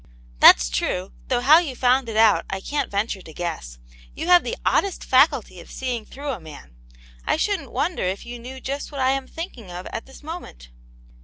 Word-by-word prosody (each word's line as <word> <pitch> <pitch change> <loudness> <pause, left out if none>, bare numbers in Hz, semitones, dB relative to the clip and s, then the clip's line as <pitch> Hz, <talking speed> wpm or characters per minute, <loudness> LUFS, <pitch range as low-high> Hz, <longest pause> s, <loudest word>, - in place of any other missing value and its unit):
"That's - - +7
true, 180 - -2 0.2
though 245 -2 +1
how 295 +6 +7
you 300 -7 -4
found 250 0 +2
it 220 - -3
out 220 -2 +5
I 190 - -3
can't 285 +6 -2
venture 200 -1 -2
to 160 - -13
guess. 60 - -5 0.4
You - - -4
have 355 -1 +7
the 485 - -4
oddest 395 -3 +1
faculty 260 - +3
of - - -13
seeing 245 -4 -4
through 285 +1 -6
a 235 - -5
man, 155 - -13 0.5
I - - +1
shouldn't 405 -1 -1
wonder 355 - -1
if 185 +2 -2
you 240 0 -8
knew 255 +3 -9
just 280 +3 -5
what 280 - -6
I 260 0 +3
am 270 -1 -2
thinking 265 - -8
of 180 +1 -7
at - - -5
this 265 +2 -15
moment 300 - -9
245 Hz, 205 wpm, -23 LUFS, 185-280 Hz, 0.5 s, That's